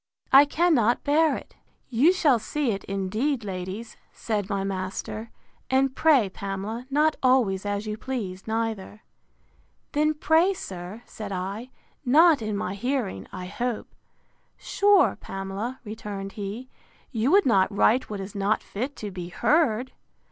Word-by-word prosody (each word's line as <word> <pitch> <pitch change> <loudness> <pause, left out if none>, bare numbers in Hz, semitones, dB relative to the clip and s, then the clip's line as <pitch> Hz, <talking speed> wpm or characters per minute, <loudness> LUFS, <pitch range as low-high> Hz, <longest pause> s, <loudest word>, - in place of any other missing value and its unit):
I 275 +2 +9
cannot 290 -7 +2
bear 300 +1 +3
it.—You 260 +8 -1
shall 300 -10 +3
see 260 +4 -1
it, 195 -1 -4
indeed, 215 +7 -1
ladies, 190 +4 -6
said 210 -3 -3
my 200 -2 -1
master; 195 +3 -4 0.4
and 265 0 +2
pray, 290 -9 +4
Pamela, 200 +5 -5
not 300 +2 +2
always 230 -7 +2
as 205 +1 -2
you 215 0 -4
please, 205 -9 -5
neither.—Then, 105 - -4
pray 325 +5 +3
sir, 185 - -8
said 210 -2 -8
I, 195 +6 -4 0.3
not 300 +2 +5
in 215 -2 -2
my 190 - -3
hearing, 215 - -2
I 180 - -6
hope.—Sure, 250 - -1
Pamela, 195 +6 -5
returned 205 -2 -6
he, 210 +5 -6 0.4
you 235 0 +1
would 395 +5 +5
not 195 -5 +3
write 225 +5 +3
what 210 -2 -4
is 195 +1 -7
not 205 +1 0
fit 255 +7 -4
to 210 -2 -6
be 180 -2 -6
heard! 260 - +2
220 Hz, 135 wpm, -26 LUFS, 195-265 Hz, 0.4 s, I